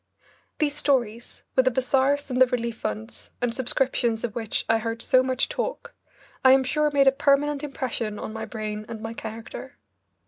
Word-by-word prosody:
These 290 Hz, -2 st, 0 dB
stories, 240 Hz, -6 st, -1 dB
with 260 Hz, -, +4 dB
the -, -, +6 dB
bazaars 265 Hz, +3 st, +1 dB
and 255 Hz, 0 st, 0 dB
the 255 Hz, -, +8 dB
relief 235 Hz, -2 st, -2 dB
funds 110 Hz, +1 st, -5 dB
and 245 Hz, -1 st, 0 dB
subscriptions 245 Hz, -2 st, 0 dB
of 235 Hz, -4 st, -2 dB
which 225 Hz, -2 st, -2 dB
I 225 Hz, 0 st, +3 dB
heard 230 Hz, +1 st, -3 dB
so 255 Hz, -, +5 dB
much 255 Hz, 0 st, 0 dB
talk, -, -, -4 dB, 0.5 s
I 260 Hz, 0 st, +8 dB
am 265 Hz, 0 st, +5 dB
sure 300 Hz, +4 st, +1 dB
made 280 Hz, -1 st, +4 dB
a 270 Hz, -, +7 dB
permanent 280 Hz, +1 st, +2 dB
impression 245 Hz, -6 st, -3 dB
on 215 Hz, -, -6 dB
my 220 Hz, 0 st, -4 dB
brain 215 Hz, -2 st, -5 dB
and 225 Hz, -, -6 dB
my 225 Hz, +1 st, -5 dB
character. 225 Hz, 0 st, -8 dB
250 Hz, 180 wpm, -25 LUFS, 225-270 Hz, 0.5 s, the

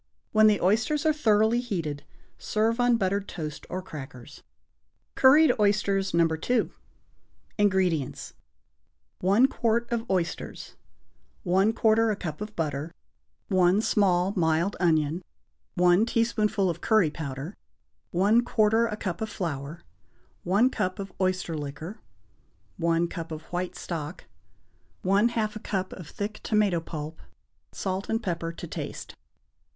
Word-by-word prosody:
When 215 Hz, 0 st, +6 dB
the 210 Hz, -2 st, +4 dB
oysters 220 Hz, -, +1 dB
are 310 Hz, -, +4 dB
thoroughly 220 Hz, -4 st, +3 dB
heated, 165 Hz, -12 st, -3 dB, 0.4 s
serve 225 Hz, +2 st, 0 dB
on 245 Hz, -1 st, +4 dB
buttered 200 Hz, 0 st, -1 dB
toast 155 Hz, -4 st, -6 dB
or 185 Hz, 0 st, -4 dB
crackers. 135 Hz, -8 st, -10 dB, 0.7 s
=Curried 295 Hz, +4 st, +6 dB
Oysters, 200 Hz, -1 st, +2 dB
No. 170 Hz, 0 st, +4 dB
2.= 165 Hz, +10 st, 0 dB, 0.9 s
INGREDIENTS. 185 Hz, -8 st, +1 dB, 0.9 s
1 200 Hz, +7 st, +4 dB
quart 235 Hz, -2 st, 0 dB
of 235 Hz, 0 st, -2 dB
oysters. 180 Hz, -3 st, -3 dB, 0.7 s
1/4 220 Hz, +4 st, +3 dB
a -, -, 0 dB
cup 165 Hz, -3 st, -6 dB
of 210 Hz, 0 st, -6 dB
butter. 150 Hz, -1 st, -2 dB, 0.6 s
One 185 Hz, 0 st, +3 dB
small 195 Hz, -3 st, +2 dB
mild 165 Hz, +2 st, +1 dB
onion. 160 Hz, -1 st, +2 dB, 0.5 s
1 180 Hz, +5 st, +4 dB
tablespoonful 220 Hz, -4 st, +1 dB
of 170 Hz, -1 st, -3 dB
curry 215 Hz, -9 st, +3 dB
powder. 145 Hz, +3 st, -6 dB, 0.6 s
1/4 220 Hz, +3 st, +3 dB
a 210 Hz, -, -4 dB
cup 190 Hz, -1 st, -4 dB
of 220 Hz, -, -2 dB
flour. 155 Hz, -2 st, -5 dB, 0.6 s
1 205 Hz, +8 st, +3 dB
cup 185 Hz, -4 st, -2 dB
of 195 Hz, -1 st, -7 dB
oyster 185 Hz, -3 st, 0 dB
liquor. 150 Hz, +6 st, -6 dB, 0.8 s
1 170 Hz, 0 st, +1 dB
cup 165 Hz, -1 st, -7 dB
of 155 Hz, 0 st, -6 dB
white 180 Hz, +1 st, -2 dB
stock. 160 Hz, -1 st, -5 dB, 0.8 s
1/2 215 Hz, +3 st, +2 dB
a -, -, -5 dB
cup 190 Hz, -3 st, -3 dB
of 175 Hz, -5 st, -9 dB
thick 210 Hz, +1 st, -5 dB
tomato 210 Hz, -5 st, +2 dB
pulp. 160 Hz, -1 st, -7 dB, 0.5 s
Salt 190 Hz, 0 st, -3 dB
and 225 Hz, +1 st, -1 dB
pepper 170 Hz, -3 st, -2 dB
to 170 Hz, -, -8 dB
taste. -, -, -6 dB
190 Hz, 125 wpm, -27 LUFS, 165-215 Hz, 0.9 s, When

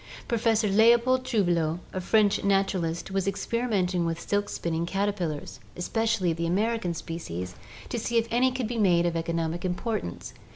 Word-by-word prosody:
Professor 225 Hz, -2 st, +2 dB
Leopold 235 Hz, +5 st, +4 dB
Trouvelot, 175 Hz, -9 st, +1 dB, 0.2 s
a 185 Hz, -, -2 dB
French 205 Hz, +1 st, +3 dB
naturalist, 195 Hz, -4 st, 0 dB
was 195 Hz, 0 st, -1 dB
experimenting 195 Hz, -4 st, 0 dB
with 165 Hz, 0 st, -2 dB
silk 205 Hz, +2 st, -1 dB
spinning 165 Hz, -1 st, -2 dB
caterpillars, 185 Hz, -9 st, -2 dB, 0.2 s
especially 200 Hz, -1 st, 0 dB
the 170 Hz, +1 st, -2 dB
American 200 Hz, -1 st, 0 dB
species, 90 Hz, -, -5 dB, 0.3 s
to 240 Hz, -, -3 dB
see 235 Hz, +1 st, -1 dB
if 230 Hz, 0 st, +2 dB
any 250 Hz, +2 st, +3 dB
could 255 Hz, -3 st, -2 dB
be 235 Hz, 0 st, -3 dB
made 175 Hz, -4 st, +4 dB
of 170 Hz, -1 st, 0 dB
economic 165 Hz, 0 st, -2 dB
importance. 180 Hz, -, -3 dB
195 Hz, 150 wpm, -27 LUFS, 170-225 Hz, 0.3 s, Leopold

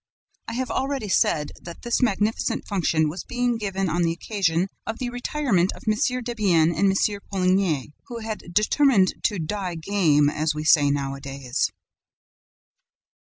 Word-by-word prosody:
I 230 Hz, -, -4 dB
have 255 Hz, +2 st, -2 dB
already 270 Hz, -5 st, -2 dB
said 150 Hz, -5 st, +2 dB
that 170 Hz, -1 st, -10 dB
this 240 Hz, -, 0 dB
magnificent 215 Hz, -2 st, 0 dB
function 165 Hz, -5 st, +1 dB
was 170 Hz, +4 st, -5 dB
being 245 Hz, -1 st, -1 dB
given 195 Hz, -2 st, -2 dB
on 175 Hz, +1 st, 0 dB
the 165 Hz, -1 st, +2 dB
occasion 175 Hz, -1 st, 0 dB, 0.2 s
of 225 Hz, -, -3 dB
the 245 Hz, -1 st, -3 dB
retirement 245 Hz, -7 st, 0 dB
of -, -, -14 dB
M. 215 Hz, -, +4 dB, 0.3 s
Debienne 195 Hz, -9 st, +2 dB
and 200 Hz, -1 st, +3 dB
M. 200 Hz, +1 st, 0 dB
Poligny, 185 Hz, -7 st, +1 dB
who 240 Hz, -3 st, -6 dB
had 220 Hz, -1 st, -5 dB
determined 215 Hz, 0 st, +3 dB
to 210 Hz, -, +1 dB
"die 180 Hz, +2 st, -3 dB
game," 160 Hz, -4 st, +2 dB
as 150 Hz, +1 st, 0 dB
we 150 Hz, -, -3 dB
say 145 Hz, -2 st, +5 dB
nowadays. 135 Hz, -2 st, -2 dB
190 Hz, 150 wpm, -24 LUFS, 160-220 Hz, 0.3 s, say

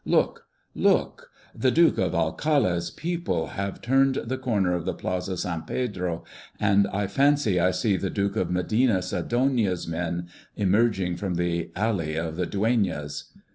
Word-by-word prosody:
Look, -, -, +1 dB, 0.3 s
look! -, -, +1 dB, 0.2 s
the 130 Hz, -, +1 dB
Duke 165 Hz, +5 st, +4 dB
of 90 Hz, -1 st, +1 dB
Alcalá's 85 Hz, -, +1 dB
people 165 Hz, -, -2 dB
have 100 Hz, 0 st, -5 dB
turned 135 Hz, +2 st, +3 dB
the 130 Hz, +2 st, -3 dB
corner 105 Hz, -8 st, +1 dB
of 90 Hz, -2 st, -1 dB
the -, -, -2 dB
Plaza 90 Hz, 0 st, -3 dB
San 85 Hz, -2 st, -2 dB
Pedro, 90 Hz, -7 st, -3 dB, 0.4 s
and 100 Hz, -1 st, +3 dB
I 100 Hz, +1 st, -1 dB
fancy 135 Hz, -2 st, +2 dB
I 90 Hz, -, +4 dB
see 100 Hz, +1 st, +1 dB
the 95 Hz, -, -2 dB
Duke 100 Hz, +2 st, -1 dB
of 90 Hz, -, 0 dB
Medina 100 Hz, +3 st, +2 dB
Sidonia's 115 Hz, -3 st, 0 dB
men 85 Hz, +1 st, -3 dB, 0.3 s
emerging 95 Hz, -3 st, +1 dB
from 95 Hz, -3 st, -2 dB
the 85 Hz, -1 st, -1 dB
Alley 95 Hz, -7 st, -1 dB
of 80 Hz, 0 st, -3 dB
the 90 Hz, 0 st, -1 dB
Dueñas. 95 Hz, -10 st, -1 dB
95 Hz, 150 wpm, -26 LUFS, 85-115 Hz, 0.4 s, Duke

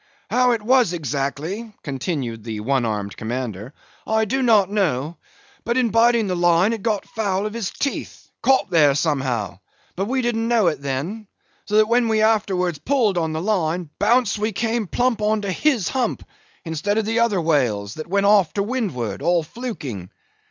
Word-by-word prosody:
"How 250 Hz, 0 st, +3 dB
it 225 Hz, -2 st, -3 dB
was 245 Hz, -5 st, +3 dB
exactly," 155 Hz, -, -3 dB
continued 135 Hz, -, -4 dB
the 110 Hz, -2 st, -5 dB
one 130 Hz, +2 st, +1 dB
armed 105 Hz, -2 st, -3 dB
commander, 115 Hz, -2 st, -5 dB, 0.4 s
"I 220 Hz, 0 st, +2 dB
do 265 Hz, +6 st, -1 dB
not 220 Hz, -6 st, +4 dB
know; 165 Hz, -6 st, 0 dB, 0.5 s
but 235 Hz, +1 st, -1 dB
in 245 Hz, -4 st, +2 dB
biting 230 Hz, 0 st, +4 dB
the 185 Hz, -2 st, -1 dB
line, 175 Hz, +4 st, +3 dB
it 225 Hz, -, -5 dB
got 210 Hz, -2 st, -1 dB
foul 200 Hz, -3 st, -2 dB
of 210 Hz, -, -4 dB
his 225 Hz, -5 st, -3 dB
teeth, 280 Hz, -, -4 dB
caught 265 Hz, -1 st, +2 dB
there 150 Hz, -5 st, +5 dB
somehow; 130 Hz, -, -1 dB, 0.4 s
but 195 Hz, -, -1 dB
we 260 Hz, +1 st, 0 dB
didn't 230 Hz, -1 st, 0 dB
know 230 Hz, -4 st, +3 dB
it 150 Hz, -4 st, -5 dB
then; 150 Hz, +11 st, -4 dB, 0.4 s
so 210 Hz, -, -2 dB
that 215 Hz, 0 st, +5 dB
when 235 Hz, +1 st, +2 dB
we 220 Hz, -1 st, +2 dB
afterwards 190 Hz, -7 st, +1 dB
pulled 240 Hz, -8 st, +1 dB
on 160 Hz, -1 st, -1 dB
the 160 Hz, +1 st, -3 dB
line, 175 Hz, -5 st, -1 dB
bounce 220 Hz, -1 st, +2 dB
we 215 Hz, +1 st, 0 dB
came 225 Hz, 0 st, -1 dB
plump 245 Hz, +2 st, 0 dB
on 210 Hz, 0 st, +1 dB
to 200 Hz, -, -2 dB
his 240 Hz, -, +1 dB
hump! 250 Hz, -4 st, -1 dB, 0.4 s
instead 165 Hz, +6 st, -1 dB
of 220 Hz, -, +1 dB
the 225 Hz, +2 st, 0 dB
other 230 Hz, -5 st, +2 dB
whale's; 120 Hz, -11 st, 0 dB
that 155 Hz, +4 st, -7 dB
went 200 Hz, +3 st, +1 dB
off 200 Hz, -5 st, +4 dB
to 200 Hz, -, 0 dB
windward, 185 Hz, -, -3 dB
all 175 Hz, -1 st, +2 dB
fluking. 150 Hz, -, -6 dB
195 Hz, 180 wpm, -22 LUFS, 145-225 Hz, 0.5 s, there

